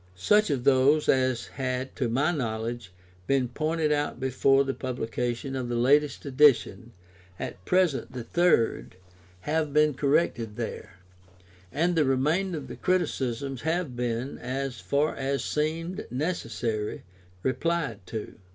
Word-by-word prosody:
Such 210 - +3
of 135 -4 -1
those 140 +3 +4
as 130 -2 +2
had 130 0 -4
(to 125 -5 0
my 140 +8 +2
knowledge) 115 - -3 0.4
been 135 -2 +2
pointed 155 +3 0
out 145 0 -1
before 135 +1 +3
the 135 0 -2
publication 125 +1 -3
of 125 -2 -3
the 120 - -1
latest 145 +6 +2
edition 135 -4 +3 0.5
(at 90 - -6
present 175 -11 +1
the 125 -2 -6
third) 145 - +1 0.5
have 150 - -1
been 150 0 +4
corrected 135 -6 +1
there, - - -6 0.7
and 170 +6 +1
the 160 - +4
remainder 155 +7 +1
of 140 -3 -7
the - - -8
criticisms 135 -8 -1
have 160 -4 -1
been, 120 +2 -3
as 130 +1 -4
far 145 +2 0
as 135 +1 -1
seemed 165 +5 -2
necessary, 115 -7 -2 0.4
replied 130 -3 -1
to. 110 -2 -6
135 Hz, 135 wpm, -27 LUFS, 120-150 Hz, 0.7 s, those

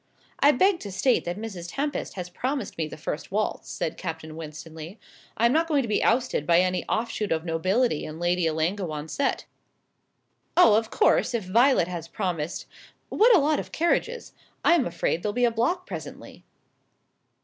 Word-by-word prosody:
"I 290 - +6
beg 370 +6 +3
to 200 - -7
state 240 +6 +1
that 175 +2 -3
Miss 200 -6 -6
Tempest 285 +10 -3
has 180 -2 -5
promised 260 +10 -3
me 160 -2 -2
the 155 - -9
first 150 +2 -5
waltz," 215 +2 -2
said 160 - -3
Captain 160 -3 -6
Winstanley. 160 +3 -9 0.4
"I 230 - +3
am 235 - +4
not 325 +2 +2
going 290 -4 +2
to - - -4
be 215 - +1
ousted 235 - +1
by 170 0 +5
any 185 0 0
offshoot 220 -2 -2
of 160 0 0
nobility 185 +3 +1
in 155 0 -7
Lady 175 0 +1
Ellangowan's 160 -1 -2
set." 280 - -1 1.1
"Oh, 290 -12 +7
of 220 +1 +2
course, - - +2
if 225 - -1
Violet 230 0 +4
has 170 -3 -6
promised 170 -4 -3 0.4
What 460 +2 +5
a - - +6
lot 295 +1 +2
of - - -7
carriages! 450 +8 -1 0.3
I - - +6
am 330 -7 +2
afraid 170 0 -1
there'll 210 +2 -2
be 245 +2 +2
a 235 - +2
block 255 +12 0
presently." - - -9
200 Hz, 180 wpm, -26 LUFS, 165-255 Hz, 1.1 s, Oh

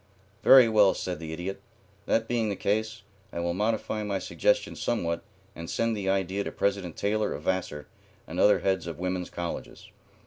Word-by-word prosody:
"Very 130 -3 +8
well," 105 -4 +5
said 90 -3 -4
the 80 -1 -6
Idiot. 90 +4 -5 0.5
"That 115 0 +1
being 115 -3 0
the 100 - -1
case, 110 +2 -1 0.3
I - - -5
will 85 0 -1
modify 110 +2 -1
my 105 -2 -1
suggestion - - 0
somewhat 85 -8 -1 0.3
and 85 0 -7
send 115 -1 0
the 100 -2 -2
idea 95 +1 0
to - - -5
President 100 -4 -1
Taylor 105 +1 0
of 75 - -8
Vassar 90 -6 -2 0.4
and - - -6
other 105 - +5
heads 95 -3 0
of 85 -3 -5
women's 90 0 -2
colleges. 85 -1 -6
95 Hz, 175 wpm, -28 LUFS, 90-110 Hz, 0.5 s, Very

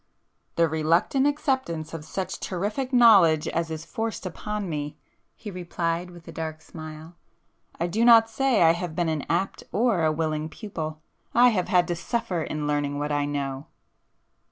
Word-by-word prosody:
——" - - -47
"The 170 0 +4
reluctant 165 - +2
acceptance 260 - -1
of 165 -2 -6
such 185 +3 -4
terrific 210 +8 -3
knowledge 195 - +6
as 165 0 -1
is 160 0 -5
forced 225 +6 -4
upon 210 +3 -4
me,—" 150 -3 -4 0.4
he 210 - -8
replied 175 -1 -3
with 175 -1 -14
a - - -7
dark 160 -1 -5
smile—"I 160 +1 -10
do 210 +7 0
not 230 -1 +7
say 230 -3 +2
I 165 - +7
have 170 -1 -4
been 175 -1 0
an 155 -3 -1
apt 190 +3 -1
or 215 -6 +2
a 155 - +3
willing 155 0 -2
pupil,—I 165 +6 -1
have 190 -6 0
had 180 -1 +3
to 175 - -1
suffer 195 -1 -2
in 155 -1 -3
learning 145 -1 -1
what 145 +1 -2
I 145 0 +1
know!" 140 0 -3
170 Hz, 165 wpm, -25 LUFS, 155-210 Hz, 0.4 s, not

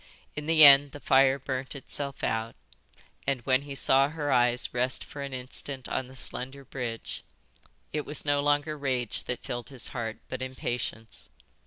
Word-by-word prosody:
In 150 0 -5
the 160 -1 +8
end 140 0 +8
the 145 - -8
fire 135 -1 +4
burnt 130 0 -3
itself 140 0 -5
out 115 +1 -1 0.7
and, 135 -3 0
when 130 +2 +2
he 140 -1 -8
saw 135 +1 +4
her 150 -2 -3
eyes 125 -1 +2
rest 125 +2 0
for 145 - -9
an 140 0 -5
instant 130 +1 -3
on 130 - -2
the 130 - -14
slender 130 +1 -3
bridge, 115 - -5 0.7
it 150 -1 -1
was 150 0 -4
no 145 0 +2
longer 145 +1 +1
rage 130 -5 -2
that 125 - -4
filled 120 +2 -5
his 130 -3 -4
heart 115 -3 -4
but 130 - -5
impatience. 120 -3 -5
130 Hz, 170 wpm, -28 LUFS, 125-140 Hz, 0.7 s, the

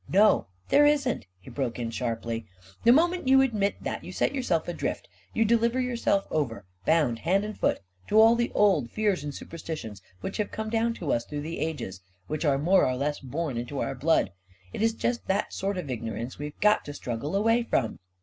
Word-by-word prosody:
" - - -25
No, 205 - +4 0.2
there 290 +1 +6
isn't! 280 - +1
" 95 - -44
he - - -11
broke 130 -4 -2
in 115 -2 -3
sharply. 115 -1 -3 0.2
" 95 0 -23
The 235 - +8
moment 345 +3 +3
you 265 0 +7
admit 215 -6 0
that, - - -3
you - - -8
set - - 0
yourself 245 - 0
adrift; 175 - -3 0.2
you 225 - +2
deliver 235 +2 +2
yourself 240 -5 +1
over, 135 -10 -1 0.2
bound 150 -8 +3
hand 190 - +2
and 215 0 -5
foot, - - 0 0.3
to 215 - +4
all 225 +1 +7
the 240 0 0
old 185 - +3
fears 205 -7 0
and 145 - -4
superstitions 145 -11 -7 0.2
which 195 - -4
have 210 -2 -1
come 220 0 -4
down 230 0 +1
to 165 -9 -1
us 115 - 0
through 145 -1 -5
the 160 +3 -5
ages 145 - -4
— 95 +1 -40
which 155 +2 -2
are 140 -2 +3
more 180 +7 +4
or 130 - +1
less 145 +3 -1
born 140 0 -3
into 120 +4 -4
our - - -1
blood. 145 - +2 0.4
It - - -4
is 225 0 +3
just 240 +1 -2
that 195 +2 0
sort 195 0 -2
of 150 -7 -4
ignorance 115 +1 -5
we've 150 0 -6
got 210 0 +4
to 145 - -7
struggle 140 +6 -4
away 225 +4 +3
from 130 - -1
165 Hz, 215 wpm, -27 LUFS, -, 0.4 s, The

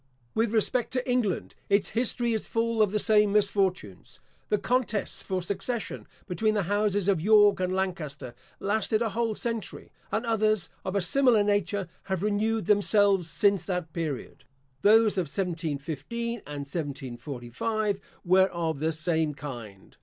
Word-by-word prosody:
With 225 -1 +1
respect 230 +2 +1
to 255 0 -1
England, 245 -8 0 0.2
its 200 0 +3
history 240 0 +1
is 220 - -2
full 230 -1 0
of 210 -3 +3
the 210 - +1
same 210 -1 +4
misfortunes. 195 - 0 0.3
The 210 - +3
contests 220 -1 -1
for 185 -2 -3
succession 200 +5 -3 0.2
between 215 +4 0
the 205 - +1
houses 205 +1 0
of 190 -5 +2
York 205 0 +5
and 185 0 0
Lancaster 150 -9 -3 0.3
lasted 215 +2 +1
a 225 - 0
whole 225 0 -1
century; 230 -4 -5 0.2
and 220 +3 -1
others 215 -4 +1
of 190 +1 -3
a 200 - +2
similar 245 0 +4
nature 205 -2 0 0.2
have 190 -1 -2
renewed 215 0 0
themselves 200 -3 +3
since 195 +5 +2
that 180 -4 -3
period. 155 -6 -4 0.4
Those 215 0 +5
of 175 - -1
1715 165 - -3 0.2
and 145 -1 -5
1745 140 - -3 0.3
were 190 +2 +5
of 165 -5 -3
the 160 +2 0
same 160 -1 -1
kind. 115 -10 -9
200 Hz, 145 wpm, -27 LUFS, 165-215 Hz, 0.4 s, York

